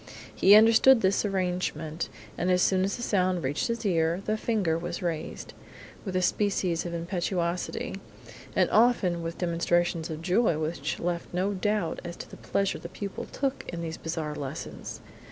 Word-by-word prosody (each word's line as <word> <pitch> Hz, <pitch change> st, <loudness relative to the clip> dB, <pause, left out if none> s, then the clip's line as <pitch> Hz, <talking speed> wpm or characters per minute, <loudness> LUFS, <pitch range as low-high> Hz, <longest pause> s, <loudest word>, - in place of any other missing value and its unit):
He 200 Hz, +2 st, +7 dB
understood 225 Hz, +3 st, +7 dB
this 190 Hz, +1 st, +2 dB
arrangement, 180 Hz, -5 st, -2 dB, 0.3 s
and 180 Hz, -, -1 dB
as 180 Hz, 0 st, +4 dB
soon 185 Hz, -1 st, +3 dB
as 195 Hz, -, -1 dB
the 240 Hz, -, -6 dB
sound 185 Hz, -5 st, +1 dB
reached 135 Hz, +3 st, -1 dB
his 230 Hz, -1 st, -3 dB
ear, 170 Hz, 0 st, +1 dB
the 215 Hz, -, +1 dB
finger 215 Hz, -7 st, 0 dB
was 175 Hz, +2 st, -4 dB
raised, 165 Hz, -3 st, -4 dB, 0.5 s
with 190 Hz, -3 st, -5 dB
a 185 Hz, -, +2 dB
species 180 Hz, -3 st, +1 dB
of 170 Hz, -, -5 dB
impetuosity, 175 Hz, 0 st, -2 dB, 0.5 s
and -, -, +4 dB
often 215 Hz, -7 st, +3 dB
with 165 Hz, 0 st, -5 dB
demonstrations 175 Hz, -1 st, 0 dB
of 160 Hz, 0 st, -6 dB
joy 185 Hz, -1 st, +2 dB
which 155 Hz, -1 st, -3 dB
left 170 Hz, 0 st, -3 dB
no 190 Hz, +3 st, +1 dB
doubt 205 Hz, -2 st, -1 dB
as 175 Hz, -1 st, -6 dB
to -, -, -9 dB
the -, -, -10 dB
pleasure 195 Hz, -1 st, -1 dB
the 170 Hz, -, -8 dB
pupil 200 Hz, +1 st, -6 dB
took 275 Hz, -1 st, -2 dB
in 170 Hz, -1 st, -5 dB
these 160 Hz, -1 st, -4 dB
bizarre 160 Hz, -2 st, -3 dB
lessons. 140 Hz, +1 st, -6 dB
180 Hz, 170 wpm, -28 LUFS, 165-200 Hz, 0.5 s, He